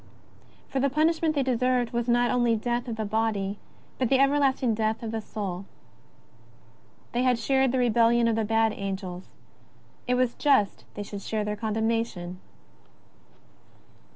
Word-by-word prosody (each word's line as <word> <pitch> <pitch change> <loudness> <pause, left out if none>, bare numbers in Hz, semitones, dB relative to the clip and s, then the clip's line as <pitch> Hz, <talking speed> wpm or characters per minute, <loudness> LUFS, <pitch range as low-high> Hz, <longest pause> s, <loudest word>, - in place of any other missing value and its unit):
Eor 265 - +1
the 275 - +2
punishment 315 +2 +1
they 280 - +2
deserved 250 -1 +1
was 235 0 -1
not 240 0 +3
only 240 -2 +2
the 215 - -5
death 240 +1 -1
of 230 - -3
the 220 -1 -3
body 210 -2 -1 0.4
but 255 -3 +1
the 270 - +4
everlasting 275 -3 +2
death 220 +1 -1
of 225 - -4
the 225 -1 -3
soul. 195 -4 -5 1.5
They 240 - 0
had 250 -1 +3
shared 265 +2 +2
the 260 - 0
rebellion 235 -1 +3
of 230 - +2
the 225 - 0
bad 225 0 +2
angels; 190 -2 -5 0.8
it 250 - +2
was 250 -1 +1
just 270 -9 +2
they 205 - -4
should 200 0 -7
share 215 +1 -2
their 210 0 -2
condemnation. 220 -4 -2
230 Hz, 155 wpm, -26 LUFS, 215-255 Hz, 1.5 s, the